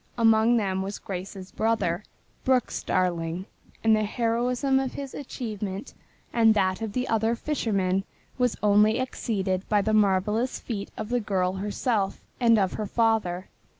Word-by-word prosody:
Among 225 +1 +5
them 190 -3 0
was 195 +2 -4
Grace's 190 0 -7
brother, 215 -5 0 0.4
Brooks 255 -2 +1
Darling, 175 -1 -1 0.4
and 220 -1 +5
the 215 - +1
heroism 245 +4 +1
of 265 -1 -2
his 275 -2 -6
achievement 210 -7 -5 0.4
and 225 -2 +5
that 185 0 +1
of 220 -2 -3
the 250 +2 -1
other 225 +1 +1
fishermen 195 -9 0 0.4
was 250 -2 +1
only 210 +1 +5
exceeded 195 -7 -2
by 205 -2 +3
the 220 - 0
marvelous 210 +4 +2
feat 205 -4 -5
of 215 0 -4
the 245 0 +1
girl 190 -4 0
herself 205 +1 -1 0.2
and 230 -2 +5
of 190 -3 +1
her 215 - -3
father. 215 -5 +1
215 Hz, 150 wpm, -26 LUFS, 190-235 Hz, 0.4 s, Among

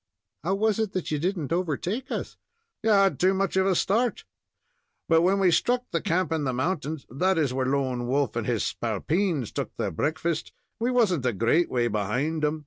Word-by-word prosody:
"How 190 +4 +1
was 215 +1 +1
it 215 -2 -1
that 185 -4 -3
you 150 - 0
didn't 170 -2 -1
overtake 185 - -2
us?" - - -4 0.5
"You 225 - 0
had 195 -2 +4
too 190 +1 +3
much 195 0 0
of 190 0 +3
a 190 - +2
start; 230 +8 +1 0.8
but 165 0 +4
when 190 +3 +3
we 185 -2 +4
struck 245 +8 +2
the - - 0
camp 185 -3 0
in 160 -2 0
the 130 -2 -1
mountains 155 +1 -2
that 185 +8 +1
is, 145 -5 +1
where 130 0 0
Lone 130 -3 -1
Wolf 135 -2 0
and 120 -2 -2
his 120 -3 0
spalpeens 145 - -1
took - - -4
their - - -1
breakfast 160 - -2 0.3
we 235 +2 +1
wasn't 195 - +2
a 120 - +1
great 115 - +2
way 120 -2 +1
behind 125 +10 -1
'em. 150 +1 +1
165 Hz, 200 wpm, -26 LUFS, 130-190 Hz, 0.8 s, had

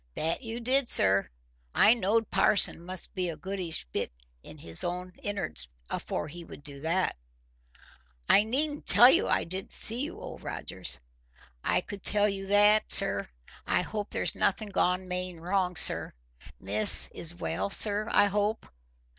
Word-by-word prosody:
"That 165 +7 -3
you 230 -1 -7
did, 255 +2 0
sir. 100 0 0 0.5
I 220 - +4
knowed 225 0 -2
parson 200 -5 +3
must 185 +1 -4
be 185 -3 -4
a 160 - -8
goodish 180 - -2
bit - - -5 0.3
in - - -14
his 85 0 -4
own 180 +1 -6
in'ards 80 - -3 0.2
afore - - -6
he 170 +3 -11
would 155 - -15
do 140 -1 -12
that." 170 +4 -2 1.1
"I 205 - +4
needn't 290 +6 -3
tell 245 +4 +7
you 365 +9 +1
I - - -1
didn't 185 +3 -8
see 230 +3 +5
you, 290 - -6
Old - - -11
Rogers." 65 - -8 0.7
"I - - -1
could 200 -1 -11
tell 205 +2 +1
you 195 -1 -6
that, 205 +2 +2
sir. 100 - +6 0.4
I - - -1
hope 210 +1 -7
there's - - -3
nothing 210 +2 -3
gone 185 -1 -2
main 180 -1 -5
wrong, 180 +1 -3
sir. - - +5 0.5
Miss 105 +2 +4
is 170 +1 -4
well, 180 - -5
sir, 210 +1 +7
I 205 - +3
hope?" 205 +2 -3
190 Hz, 160 wpm, -26 LUFS, 170-210 Hz, 1.1 s, tell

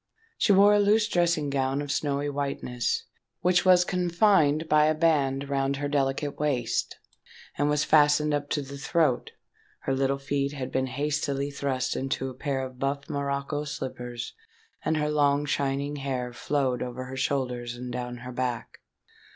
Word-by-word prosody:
She - - +4
wore 200 +1 +7
a 205 - +4
loose 210 +1 +4
dressing 170 -7 +1
gown 135 0 0
of 145 -1 -3
snowy 145 -1 -1
whiteness, 140 -4 -2 0.4
which 180 0 +3
was 180 -1 +6
confined 175 -4 +2
by 150 0 +5
a 155 - +2
band 140 -4 +1
round 135 0 0
her 145 +1 -2
delicate 140 0 -1
waist, 135 -6 -1 0.6
and 145 +1 +1
was 150 0 +2
fastened 150 0 +4
up 145 0 -1
to 145 - -1
the 140 +1 -9
throat: 150 -3 +1 0.5
her 135 - -1
little 135 +1 +1
feet 140 +1 -2
had 135 -3 -5
been 130 0 0
hastily 140 +1 -1
thrust 135 -2 -2
into 135 0 -2
a - - -10
pair 135 0 -2
of 130 -1 -11
buff 140 +1 -2
morocco 140 +1 -2
slippers; 125 -4 -5 0.5
and 160 - +1
her 150 0 0
long 145 -1 +2
shining 140 0 -1
hair 130 -3 -3
flowed 130 -2 -1
over 125 +1 -4
her 130 +1 -7
shoulders 125 -3 -2
and 125 0 -6
down 125 0 -4
her 125 - -6
back. 125 -1 -3
140 Hz, 165 wpm, -27 LUFS, 130-150 Hz, 0.6 s, wore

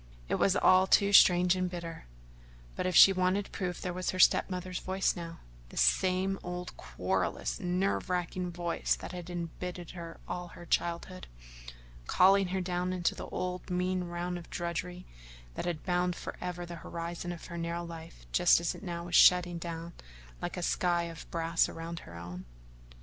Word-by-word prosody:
It - - 0
was 195 - +3
all 185 -1 +5
too 200 +1 +4
strange 180 -1 +7
and 185 -1 -1
bitter, 170 -2 -7 0.7
but - - -1
if 180 - -1
she 195 - +9
wanted 185 +2 0
proof 180 -2 -3
there 180 - -3
was 185 0 -2
her 185 - -2
step 185 - +5
mother's 180 -1 -4
voice 190 +1 0
now 165 -2 -8 0.3
the - - -12
same 185 - +2
old, 180 0 -6
querulous, - - -2
nerve 180 +1 -1
racking 180 0 -2
voice 175 0 -1
that - - -8
had 180 -1 -7
embittered 175 0 -6
all 180 0 -4
her 175 0 -12
childhood 175 +2 -2 0.8
calling 195 +1 +5
her 190 +1 -2
down 180 0 -1
into 180 -2 0
the - - -7
old 180 0 -4
mean 180 0 0
round 175 +1 -4
of 170 - -13
drudgery 175 +1 -4 0.5
that - - -4
had 170 -3 -3
bound 180 -1 +1
forever 175 0 -6
the 170 0 -8
horizon 170 +2 -5
of 170 - -8
her 170 - -7
narrow 170 +1 -3
life 165 0 -10
just 175 -1 +5
as 170 - -1
now 170 -4 -5
it - - -8
was 175 0 -2
shutting 175 -1 +6
down 170 0 -6 0.5
like - - -4
a - - -3
sky 170 - +1
of 165 -1 -8
brass 165 0 +1
around 165 +1 -6
her 85 - -11
own. 90 +1 -8
175 Hz, 175 wpm, -31 LUFS, 170-185 Hz, 0.8 s, she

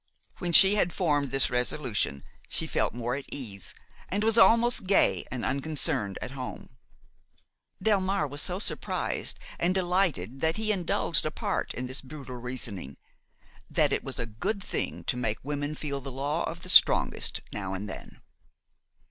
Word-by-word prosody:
When 175 - -1
she 190 +4 +9
had 190 -4 +2
formed 145 -6 0
this 135 0 +3
resolution, 125 - -1 0.3
she - - -1
felt - - -1
more 120 0 -2
at 140 +1 -6
ease 105 -9 -6 0.3
and 205 +3 -1
was 225 0 +3
almost 235 -2 +4
gay 195 - +3
and 125 -3 -4
unconcerned 135 -8 -1
at - - -6
home. 130 -2 -7 1.1
Delmare 195 -6 +2
was 145 +2 -1
so 180 - -2
surprised 205 - -2 0.2
and 180 +2 +1
delighted 175 - 0
that 160 +3 +1
he 215 0 +1
indulged 175 -4 +1
apart 155 0 -2
in 125 - -4
this 130 +1 -4
brutal 135 -2 -9
reasoning: 115 - -4 0.7
that - - +2
it - - 0
was - - -4
a - - -2
good 150 - -3
thing - - -3
to 125 - -1
make 115 -3 -1
women 145 +1 -3
feel 140 -2 -4
the 135 +1 -7
law 145 +5 -2
of 165 +1 -6
the 180 - -6
strongest - - +5
now 95 -2 -4
and 100 +2 -5
then. - - -9
145 Hz, 160 wpm, -28 LUFS, 125-180 Hz, 1.1 s, she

